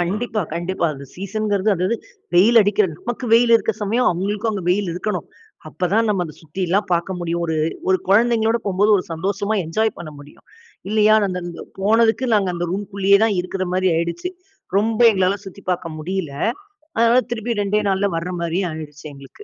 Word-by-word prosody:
கண்டிப்பா, 215 Hz, +5 st, -1 dB
கண்டிப்பா. 175 Hz, +1 st, -1 dB
அந்த 140 Hz, 0 st, -10 dB
சீசன்ங்கிறது 200 Hz, +1 st, -1 dB
அதாவது 185 Hz, +5 st, 0 dB, 0.4 s
வெயில் 215 Hz, +7 st, +6 dB
அடிக்கிற 205 Hz, 0 st, +3 dB
நமக்கு 240 Hz, +1 st, -5 dB
வெயில் 235 Hz, 0 st, +5 dB
இருக்க 225 Hz, -, -1 dB
சமயம், 230 Hz, +5 st, +2 dB
அவங்களுக்கும் 205 Hz, +5 st, -1 dB
அங்க 200 Hz, -3 st, -4 dB
வெயில் 195 Hz, +1 st, +1 dB
இருக்கணும். 180 Hz, 0 st, -3 dB, 0.4 s
அப்பதான் 185 Hz, +8 st, 0 dB
நம்ம 195 Hz, -4 st, +1 dB
அத 155 Hz, -, -10 dB
சுத்தில்லாம் 185 Hz, +5 st, -1 dB
பார்க்க 175 Hz, +2 st, 0 dB
முடியும். 170 Hz, 0 st, -2 dB
ஒரு 160 Hz, -1 st, -1 dB, 0.3 s
ஒரு 185 Hz, -, +4 dB
குழந்தைங்களோட 225 Hz, +2 st, +3 dB
போகும்போது 200 Hz, +2 st, +2 dB
ஒரு 185 Hz, -, -2 dB
சந்தோஷமா 200 Hz, +5 st, -2 dB
என்ஜாய் 220 Hz, +7 st, 0 dB
பண்ண 170 Hz, -3 st, -7 dB
முடியும். 145 Hz, +1 st, -16 dB, 0.4 s
இல்லையா 215 Hz, 0 st, +4 dB
நான் 200 Hz, -, +1 dB
அந்த 180 Hz, -1 st, -3 dB
அங்க 175 Hz, -1 st, -7 dB, 0.2 s
போனதுக்கு, 225 Hz, +4 st, +3 dB
நாங்க 200 Hz, -3 st, +2 dB
அந்த 175 Hz, 0 st, -2 dB
ரூம்குள்ளேயே 200 Hz, 0 st, +2 dB
தான் 215 Hz, -3 st, +1 dB
இருக்குற 185 Hz, +1 st, -3 dB
மாரி 185 Hz, 0 st, +2 dB
ஆயிடுச்சு. 170 Hz, -, -2 dB, 0.5 s
ரொம்ப 220 Hz, +2 st, +1 dB
எங்களால 190 Hz, -1 st, +1 dB
சுத்தி 195 Hz, +1 st, -10 dB
பார்க்க 175 Hz, -3 st, -3 dB
முடியல. 170 Hz, -1 st, -3 dB, 0.7 s
அதனால 235 Hz, +2 st, +5 dB
திருப்பி 230 Hz, -1 st, -2 dB
2டே 205 Hz, +1 st, +1 dB
நாள்ல 195 Hz, +1 st, +1 dB
வர்ற 170 Hz, +2 st, -4 dB
மாரியே 170 Hz, +3 st, -1 dB
ஆயிருச்சு 150 Hz, -1 st, -9 dB
எங்களுக்கு. 140 Hz, -, -14 dB
195 Hz, 170 wpm, -20 LUFS, 175-215 Hz, 0.7 s, வெயில்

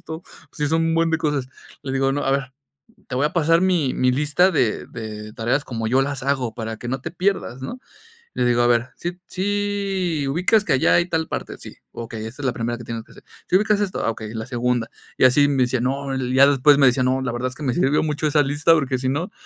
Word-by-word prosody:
esto, 160 Hz, +2 st, -8 dB, 0.3 s
sí 150 Hz, -1 st, -2 dB
son 165 Hz, +1 st, +2 dB
un 165 Hz, -, +1 dB
buen 165 Hz, 0 st, +2 dB
de 160 Hz, -, +2 dB
cosas. 145 Hz, -5 st, -1 dB, 0.3 s
Le 135 Hz, -, -5 dB
digo, 135 Hz, 0 st, +1 dB
¿no?: 145 Hz, -, -2 dB
"A 135 Hz, -, +1 dB
ver, 135 Hz, -1 st, -1 dB, 0.6 s
te 125 Hz, -, -5 dB
voy 140 Hz, -, +2 dB
a 150 Hz, -, -2 dB
pasar 165 Hz, 0 st, +3 dB
mi 175 Hz, -8 st, +1 dB
mi 130 Hz, 0 st, +2 dB
lista 150 Hz, +7 st, +2 dB
de 120 Hz, -9 st, 0 dB
de 110 Hz, -1 st, -8 dB
tareas 125 Hz, +5 st, 0 dB
como 115 Hz, -3 st, -3 dB
yo 130 Hz, +3 st, +3 dB
las 140 Hz, -1 st, -3 dB
hago, 130 Hz, -5 st, -1 dB
para 110 Hz, -1 st, -5 dB
que 120 Hz, -, -8 dB
no 135 Hz, +1 st, -2 dB
te -, -, -6 dB
pierdas", 180 Hz, -9 st, -1 dB
¿no? 245 Hz, -, -6 dB, 0.5 s
Le 125 Hz, -, 0 dB
digo: 120 Hz, 0 st, +3 dB
"A 120 Hz, -, +3 dB
ver, 120 Hz, +1 st, +2 dB
¿sí 175 Hz, +1 st, -5 dB
sí 195 Hz, -5 st, -1 dB
ubicas 185 Hz, +8 st, +2 dB
que -, -, +1 dB
allá 130 Hz, -, +3 dB
hay 170 Hz, +1 st, +3 dB
tal 160 Hz, -1 st, -1 dB
parte?", -, -, -5 dB
"sí". -, -, -11 dB, 0.2 s
"Okey, 115 Hz, -1 st, -6 dB
esta 120 Hz, +6 st, -8 dB
es -, -, -2 dB
la 125 Hz, -, +1 dB
primera 120 Hz, 0 st, -3 dB
que 120 Hz, -, -10 dB
tienes 115 Hz, 0 st, -5 dB
que -, -, -20 dB
hacer". -, -, -16 dB, 0.3 s
"¿Sí 180 Hz, -, +2 dB
ubicas 210 Hz, 0 st, +1 dB
esto?", 195 Hz, -2 st, -2 dB
"ah, 115 Hz, -, +2 dB
okey, 110 Hz, 0 st, -8 dB
la 110 Hz, 0 st, -4 dB
segunda". 120 Hz, -2 st, -1 dB, 0.3 s
Y -, -, +2 dB
así 145 Hz, +3 st, +5 dB
me 135 Hz, -3 st, +2 dB
decía: 125 Hz, 0 st, 0 dB
"No" 135 Hz, +1 st, -2 dB, 0.2 s
ya 135 Hz, +1 st, +7 dB
después 140 Hz, +1 st, +5 dB
me 135 Hz, -, +6 dB
decía: 125 Hz, +1 st, +2 dB
"No, 130 Hz, +1 st, +1 dB
la 130 Hz, -2 st, -2 dB
verdad 120 Hz, +2 st, -2 dB
es 130 Hz, -, -12 dB
que 155 Hz, -, -9 dB
me 125 Hz, -3 st, 0 dB
sirvió 150 Hz, -3 st, +2 dB
mucho 150 Hz, 0 st, -1 dB
esa 150 Hz, 0 st, +3 dB
lista, 145 Hz, +4 st, +3 dB
porque 135 Hz, -5 st, +1 dB
si 130 Hz, -, -2 dB
no, 165 Hz, +8 st, -2 dB
135 Hz, 255 wpm, -22 LUFS, 125-160 Hz, 0.6 s, ya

